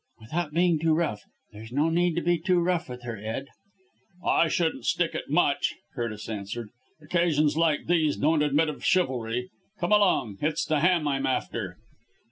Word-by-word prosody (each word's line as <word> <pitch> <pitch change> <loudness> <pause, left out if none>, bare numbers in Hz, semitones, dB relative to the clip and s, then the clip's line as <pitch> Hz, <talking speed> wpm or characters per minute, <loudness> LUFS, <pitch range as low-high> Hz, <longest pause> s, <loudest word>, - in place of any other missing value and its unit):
"Without 150 +8 -3
being 170 0 +2
too 160 0 +2
rough! 150 -11 -1 0.3
There's 110 +2 -10
no 150 +5 +1
need 175 0 +2
to 175 - -1
be 175 0 +2
too 180 +1 +2
rough 175 -3 0
with 125 0 -8
her, 120 -2 -5
Ed." 110 +7 -5 0.8
"I 165 - +4
shouldn't 165 0 -1
stick - - +1
at - - -5
much!" - - +2 0.2
Curtis 110 -3 -4
answered. 105 +1 -5 0.3
"Occasions 155 -2 +2
like 160 -2 +1
these 160 -3 +2
don't 155 +1 +2
admit 150 +2 +2
of 150 - -7
chivalry. 125 -8 0 0.3
Come 175 +2 -1
along! 180 - +3
It's 155 +1 0
the 155 -1 +1
ham 170 -1 +3
I'm 135 -1 0
after." 105 -7 -2
150 Hz, 170 wpm, -27 LUFS, 120-170 Hz, 0.8 s, I